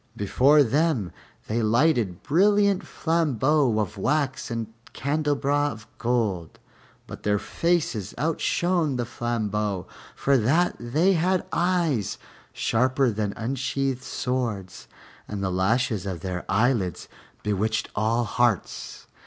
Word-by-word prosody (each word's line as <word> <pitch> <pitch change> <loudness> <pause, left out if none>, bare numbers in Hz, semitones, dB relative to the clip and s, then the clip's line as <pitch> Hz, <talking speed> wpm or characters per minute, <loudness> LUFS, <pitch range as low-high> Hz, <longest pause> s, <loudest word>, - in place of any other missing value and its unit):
Before 135 +9 +4
them 135 - +1 0.3
they 115 +2 -1
lighted 115 - +2
brilliant 200 +4 +3
flambeaux 150 -6 +1
of 105 -1 -2
wax 140 +2 0
in 115 -1 -4 0.2
candelabra 145 0 0
of 105 -4 -9
gold, 110 -9 -1 0.5
but - - -9
their 105 0 +1
faces 155 - -1
outshone 165 +1 0
the 120 -1 -1
flambeaux, 105 -5 -2 0.3
for 140 -1 +2
that 155 +11 +2
they 155 +11 +2
had 185 +2 +1
eyes 170 - 0 0.3
sharper 130 +2 +1
than 105 -1 -2
unsheathed 130 +2 -2
swords 110 - -3 0.4
and 100 -2 -4
the 95 - 0
lashes 105 +2 +1
of 90 -4 -4
their 90 -2 -4
eyelids 100 - +1 0.4
bewitched 105 +2 0
all 110 +3 +1
hearts. 120 -2 -1
120 Hz, 110 wpm, -25 LUFS, 105-150 Hz, 0.5 s, Before